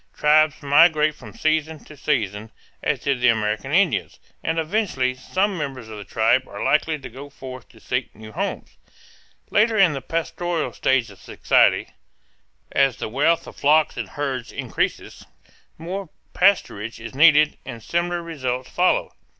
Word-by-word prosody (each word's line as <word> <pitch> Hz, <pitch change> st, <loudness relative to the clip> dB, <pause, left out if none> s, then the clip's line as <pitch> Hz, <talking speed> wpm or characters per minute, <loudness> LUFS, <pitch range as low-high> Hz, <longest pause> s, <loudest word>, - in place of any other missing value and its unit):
Tribes 155 Hz, 0 st, +3 dB
migrate 155 Hz, +1 st, +5 dB
from -, -, -13 dB
season 155 Hz, 0 st, -1 dB
to 150 Hz, -, -13 dB
season, 110 Hz, -7 st, -2 dB, 0.3 s
as -, -, -1 dB
did 135 Hz, -3 st, -1 dB
the 125 Hz, -, +4 dB
American 110 Hz, +2 st, 0 dB
Indians, 165 Hz, -, +1 dB, 0.3 s
and 165 Hz, 0 st, -1 dB
eventually 160 Hz, -7 st, 0 dB
some 190 Hz, +10 st, -1 dB
members 135 Hz, -8 st, -5 dB
of 110 Hz, -1 st, -8 dB
the -, -, -7 dB
tribe 115 Hz, +5 st, +1 dB
are -, -, -7 dB
likely 155 Hz, +1 st, +1 dB
to 135 Hz, -3 st, -9 dB
go 135 Hz, +4 st, -10 dB
forth 130 Hz, -2 st, -10 dB
to -, -, -19 dB
seek -, -, -3 dB
new 110 Hz, 0 st, -11 dB
homes. -, -, -5 dB, 0.7 s
Later 220 Hz, +1 st, +3 dB
in 190 Hz, -6 st, +5 dB
the 135 Hz, -, -4 dB
pastoral 165 Hz, +3 st, -3 dB
stage 125 Hz, -5 st, +1 dB
of 95 Hz, -, -16 dB
society, -, -, +2 dB, 0.8 s
as 135 Hz, -3 st, +2 dB
the -, -, -4 dB
wealth 150 Hz, +8 st, +1 dB
of -, -, -11 dB
flocks 155 Hz, +2 st, +3 dB
and -, -, -5 dB
herds 135 Hz, -4 st, -4 dB
increases, -, -, -3 dB, 0.5 s
more 180 Hz, +3 st, -6 dB, 0.2 s
pasturage 115 Hz, -, +1 dB
is 115 Hz, +2 st, -8 dB
needed 150 Hz, +1 st, +5 dB
and 115 Hz, -2 st, -9 dB
similar 175 Hz, +3 st, -1 dB
results 130 Hz, -6 st, -4 dB
follow. 180 Hz, +1 st, +1 dB
145 Hz, 155 wpm, -22 LUFS, 125-165 Hz, 0.8 s, migrate